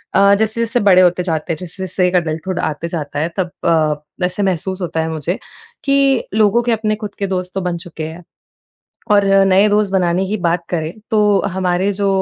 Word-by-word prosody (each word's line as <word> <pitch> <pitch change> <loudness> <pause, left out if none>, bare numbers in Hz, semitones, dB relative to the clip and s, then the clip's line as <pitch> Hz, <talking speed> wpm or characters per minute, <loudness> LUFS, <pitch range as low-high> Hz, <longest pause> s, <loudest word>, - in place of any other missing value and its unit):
अ, 200 0 +6
जैसे-जैसे 230 +2 0
बड़े 185 -2 +6
होते 180 0 +3
जाते 165 -1 -2
हैं। - - -6
जैसे-जैसे 185 +1 -2
एक 180 - -1
अडल्टहुड 170 +2 -1
आते 155 +2 -2
जाता 150 -4 -4
है। 160 +3 0
तब 180 -2 -1
अ, 155 -3 +3 0.3
ऐसे 185 +3 -2
महसूस 190 0 -1
होता 165 -2 -2
है 160 - -2
मुझे 160 +4 -2 0.5
कि 275 -2 +3
लोगों 215 +2 +3
के 240 - 0
अपने 215 -1 0
ख़ुद 210 - -6
के 200 - -1
दोस्त 185 -1 -3
तो 195 - -1
बन 180 -1 -2
चुके 165 -2 -8
हैं। 165 +2 -10 0.9
और 205 -1 +5
अ, 195 0 +5
नए 195 +2 +4
दोस्त 205 -1 +1
बनाने 180 0 +1
की 210 - -2
बात 170 -1 0
करें। 160 -1 -2 0.2
तो 220 - +2 0.3
हमारे 185 +1 0
जो 200 0 0
185 Hz, 200 wpm, -17 LUFS, 170-200 Hz, 0.9 s, अ